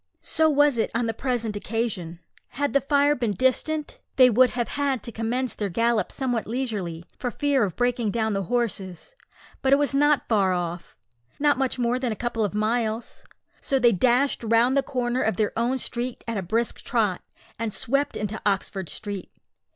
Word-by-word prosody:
So 315 0 +2
was 290 -4 +3
it - - +1
on 235 +1 +1
the 225 - -1
present 235 -3 -2
occasion. 205 -6 -3 0.3
Had 285 +3 -2
the 280 - +4
fire 285 +2 +3
been 235 -6 -1
distant, 290 - 0 0.2
they 255 -2 +7
would 250 +3 +5
have 240 -1 -2
had 280 -3 -1
to 235 - -6
commence 235 +3 -1
their 205 -2 -3
gallop 230 +1 +1
somewhat 245 -4 -2
leisurely, 210 -9 -3
for 250 - -1
fear 280 0 +1
of 190 -4 -2
breaking 245 -2 0
down 220 0 0
the 195 -1 -1
horses; 205 - -2 0.5
but 265 - +1
it - - +8
was 285 0 +2
not 290 0 +3
far 195 -5 +2
off 175 -1 -4 0.4
not 290 -2 +2
much 265 -1 0
more 245 0 +1
than 255 -3 -1
a - - -2
couple 235 0 -2
of 205 0 -2
miles 220 +1 -1 0.4
so 275 - 0
they 240 -2 +5
dashed 250 +6 +2
round 230 +3 +3
the 275 - +4
corner 250 -2 -1
of 215 -4 0
their 215 -2 0
own 240 +3 +1
street 245 0 -3
at 230 - -2
a 200 - -1
brisk 225 +6 -2
trot, 215 -7 0 0.4
and 230 -1 -2
swept 275 +7 -1
into 210 +1 -4
Oxford 195 -2 -1
Street. 200 -3 -6
235 Hz, 190 wpm, -25 LUFS, 210-260 Hz, 0.5 s, it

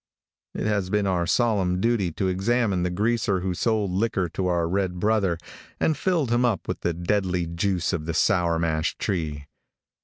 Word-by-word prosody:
It - - -3
has 100 -3 0
been 105 0 +1
our 90 -3 0
solemn 95 -5 +2
duty 110 -4 +1
to 95 - -1
examine 100 +1 +1
the 90 - 0
greaser 105 0 0
who 95 0 -1
sold 105 0 0
liquor 95 -2 0
to 95 +3 -2
our 85 -2 +1
red 90 0 -1
brother, 105 -4 +1 0.4
and 155 - +2
filled 155 -5 0
him 120 +1 +3
up 115 -7 0
with - - -3
the 85 - -1
deadly 90 0 0
juice 85 +2 -1
of 80 -2 -3
the 85 - -2
sour 85 -4 +2
mash 80 0 -1
tree. 80 -7 -2
95 Hz, 180 wpm, -25 LUFS, 85-110 Hz, 0.4 s, him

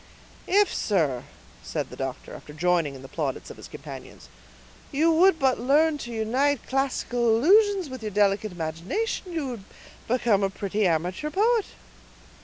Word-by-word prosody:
"If, 405 +2 +3
sir," 155 - 0 0.4
said - - -4
the - - -8
doctor, - - -5
after 150 - -11
joining 165 -3 +1
in 130 - -11
the - - -9
plaudits 140 -3 -4
of - - -12
his - - -10
companions, - - -10 0.6
"you 315 +4 +3
would 350 +2 +5
but 265 -4 +2
learn 295 +5 +3
to 240 - -7
unite 250 +5 0
classical 255 -3 0
allusions 395 - +4
with 260 -2 -8
your 215 - -3
delicate 205 +1 +1
imagination 180 - -3
you 320 -5 -2
would 235 -5 -7 0.4
become 230 -4 +2
a 195 - +1
pretty 200 +1 -1
amateur 180 - -1
poet." 435 +5 +2
235 Hz, 155 wpm, -26 LUFS, -, 0.6 s, would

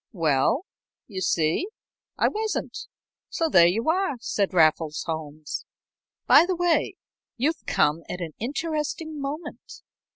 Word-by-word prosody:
"Well 165 - +1 0.4
you 190 -4 -6
see, 165 - +1 0.5
I - - +3
wasn't, 435 0 -2 0.5
so 330 -2 0
there 170 - +7
you 220 - 0
are," 370 -4 0
said 200 -3 -1
Raffles 160 -3 +2
Holmes. 155 -2 -5 0.6
"By - - +8
the 370 - 0
way, 350 -1 +1 0.4
you've 305 +7 0
come 150 +3 +2
at 180 - -4
an 170 -3 -4
interesting 305 +3 -3
moment. 295 +3 -7
230 Hz, 125 wpm, -25 LUFS, -, 0.6 s, By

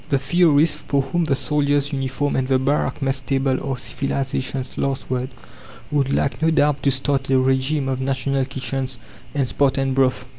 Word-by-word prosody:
The 140 - +3
theorists 150 +1 +3
for 140 -2 0
whom 170 +4 -1
the 140 -3 +1
soldier's 145 0 0
uniform 135 +1 -1
and 130 -1 0
the 130 -1 +3
barrack 140 +2 0
mess 135 0 0
table 135 -1 0
are 135 -2 -2
civilization's 130 0 -3
last 135 -1 -2
word 130 0 -1 0.6
would 140 -2 +1
like 140 - 0
no 160 - +3
doubt 150 -3 +2
to 140 - +2
start 135 +1 -1
a 135 - +4
regime 135 +2 +1
of 130 -1 -2
National 135 0 0
Kitchens 130 -1 -3 0.4
and 135 -3 +1
"Spartan 135 0 +1
Broth." 130 -1 +1
135 Hz, 175 wpm, -21 LUFS, 130-145 Hz, 0.6 s, a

